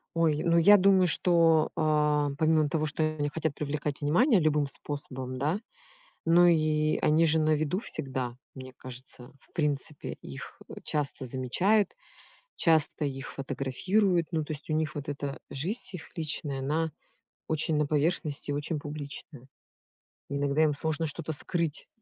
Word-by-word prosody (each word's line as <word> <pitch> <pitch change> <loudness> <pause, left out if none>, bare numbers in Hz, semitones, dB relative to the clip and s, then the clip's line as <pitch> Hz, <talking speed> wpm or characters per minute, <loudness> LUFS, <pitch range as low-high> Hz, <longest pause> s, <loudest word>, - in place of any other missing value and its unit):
Ой, 160 -2 +2
ну 170 0 +3
я 205 +5 +8
думаю, 190 -1 +5
что, 165 -1 +4
э, 150 -2 +2
помимо 155 0 +3
того, 155 +1 -1
что 155 +2 -1
они 145 -1 -1
хотят 155 -1 -2
привлекать 145 -1 -3
внимание 185 - +4
любым 150 -2 +2
способом, 130 -2 -6
да? 155 +9 0 0.7
Ну 175 +2 +6
и 155 -2 +2
они 155 +2 +3
же 160 +1 +4
на 155 0 +2
виду 155 +5 0
всегда, 130 - -4 0.2
мне 130 -1 -9
кажется. 125 0 -10
В - - -28
принципе, 150 -1 -2
их, 70 - -9
э, - - -8
часто 145 -3 -2
замечают, 140 - +1 0.6
часто 160 -2 +2
их 135 -1 -6
фотографируют. 170 +7 0
Ну, 160 -2 0
то 155 - -5
есть, 150 +1 -8
у 155 - 0
них 155 0 -1
вот 145 -1 -6
эта 140 -1 -4
жизнь 180 - -2
их 165 - -8
личная, 150 -3 -2
она 155 +4 -1 0.5
очень 160 0 +1
на 150 -1 +2
поверхности, 150 -1 0
очень 145 +2 -2
публичная. 145 -2 -8 0.8
Иногда 140 +2 +1
им 150 -2 +2
сложно 160 +2 -1
что-то 155 +1 -2
скрыть. 165 +1 -1
150 Hz, 150 wpm, -28 LUFS, 140-165 Hz, 0.8 s, я